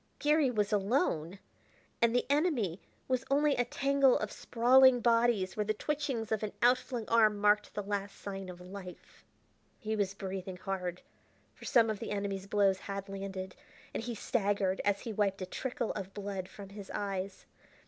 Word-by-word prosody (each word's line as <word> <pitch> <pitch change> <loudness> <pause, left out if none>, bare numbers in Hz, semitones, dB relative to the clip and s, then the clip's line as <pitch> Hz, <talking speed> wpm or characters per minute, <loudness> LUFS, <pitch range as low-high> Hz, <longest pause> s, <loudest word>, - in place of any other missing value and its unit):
Garry 300 -2 +3
was 210 -3 0
alone! 200 - +1 0.6
and 235 0 +4
the 245 - +2
enemy 280 - +1 0.3
was 255 -1 0
only 290 +1 +3
a 245 - +2
tangle 275 +1 +3
of 215 - -3
sprawling 255 +2 +5
bodies 230 -5 +2
where 210 - 0
the 215 +1 -1
twitching 290 -2 -2
of 220 -1 -2
an 215 -1 -3
outflung 245 -2 +2
arm 215 -2 +4
marked 210 +1 +3
the 205 - -2
last 200 0 -3
sign 195 -2 -6
of 180 -1 -9
life. 180 0 -11 0.5
He 220 0 -3
was 200 -2 -1
breathing 190 -1 -5
hard, 180 -1 -4 0.5
for - - -13
some 230 -3 +4
of 210 - -5
the - - -5
enemies' 200 -1 -3
blows 195 -2 +3
had 195 0 -6
landed, 195 -1 -5 0.4
and - - -2
he 235 0 -4
staggered 200 -3 0
as 205 -1 +1
he 225 - -5
wiped 195 -2 0
a - - -2
trickle 240 +4 -3
of 195 0 -6
blood 195 -2 -4
from 200 -2 -10
his 200 -1 -10
eyes. 195 -1 -4
205 Hz, 170 wpm, -32 LUFS, 195-240 Hz, 0.6 s, sprawling